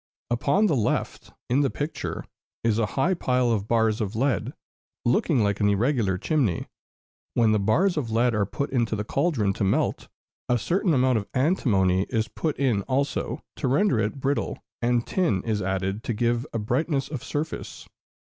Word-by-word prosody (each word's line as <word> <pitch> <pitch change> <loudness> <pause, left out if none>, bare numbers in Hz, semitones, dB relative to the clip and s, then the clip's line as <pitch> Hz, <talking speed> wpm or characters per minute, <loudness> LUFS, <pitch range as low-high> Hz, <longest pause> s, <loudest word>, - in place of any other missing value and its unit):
Upon 140 - +2
the 160 - +2
left, 110 -5 -1 0.2
in 125 +3 +2
the 140 - +2
picture, 145 +2 -4 0.4
is 115 -1 +2
a 110 - +1
high 170 +8 +3
pile 125 -7 +1
of 105 -2 -1
bars 110 -1 +2
of 105 0 -3
lead, 125 -4 0 0.5
looking 125 +1 +2
like 100 -1 0
an 105 - +3
irregular 105 -2 +1
chimney. 125 - 0 0.7
When 115 -2 +4
the 110 - +3
bars 155 - +2
of 130 -6 -1
lead 115 +2 +2
are 105 -3 +1
put 140 +7 -3
into 120 -4 +1
the 105 - -2
cauldron 120 - 0
to - - -3
melt, 95 - 0 0.4
a 125 - +3
certain 170 - +1
amount 130 -2 +3
of 100 - -8
antimony 100 - +2
is 115 -2 0
put 155 +5 -3
in 125 -7 +1
also, 140 +2 -1
to 140 - -1
render 140 - +2
it 110 +6 -1
brittle, 140 +1 -1 0.2
and 120 0 +1
tin 110 - 0
is 110 -3 -1
added 95 +2 -2
to 120 - -1
give 120 +1 0
a - - -2
brightness 135 +6 0
of 140 -4 -6
surface. 150 +2 -5
120 Hz, 180 wpm, -25 LUFS, 105-140 Hz, 0.7 s, When